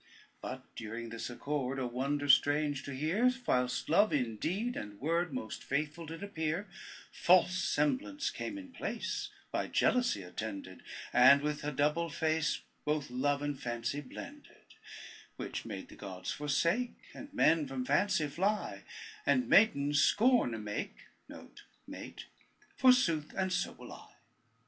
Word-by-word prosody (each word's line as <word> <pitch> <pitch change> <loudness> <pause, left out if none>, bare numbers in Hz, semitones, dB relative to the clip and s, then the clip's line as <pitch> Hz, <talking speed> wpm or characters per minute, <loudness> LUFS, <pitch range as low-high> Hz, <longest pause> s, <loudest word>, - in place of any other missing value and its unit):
But - - -6
during 115 +1 -6
this 115 +1 -5
accord, 135 +1 -3
A 130 - -1
wonder 140 +4 -1
strange 145 +1 +4
to 140 - -5
hear, 180 - +2
Whilst 125 0 +1
Love 205 +7 +4
in 120 -6 0
deed 205 - -1
and 105 -1 -7
word 165 +4 0
Most 125 -4 -5
faithful 155 +4 -2
did 165 +4 -7
appear, 170 0 -2 0.4
False 180 +1 +4
semblance 255 - 0
came 300 - -5
in 280 -2 -9
place, - - -3 0.2
By - - -1
Jealousy 245 - +2
attended, 95 0 -6 0.3
And 140 +3 +7
with 150 0 -2
a 150 - -1
double 150 +4 +1
face 160 0 0 0.2
Both 150 -3 -1
love 140 +3 0
and 145 -2 -3
fancy 120 +3 -2
blended; 280 - -11 0.6
Which - - -5
made 100 -4 -7
the - - -12
gods 95 -2 -6
forsake, 170 - 0 0.2
And 280 0 -10
men 165 - +3
from 130 -1 -4
fancy 155 +3 +2
fly, 190 +9 -1 0.4
And 255 -10 +2
maidens 145 -9 +5
scorn 235 - +4
a 105 -1 -4 1.0
make, - - -8 0.5
Forsooth, 215 - +3
and 190 -1 0
so 175 +2 -1
will - - -11
I. - - -14
150 Hz, 140 wpm, -32 LUFS, 130-185 Hz, 1.0 s, And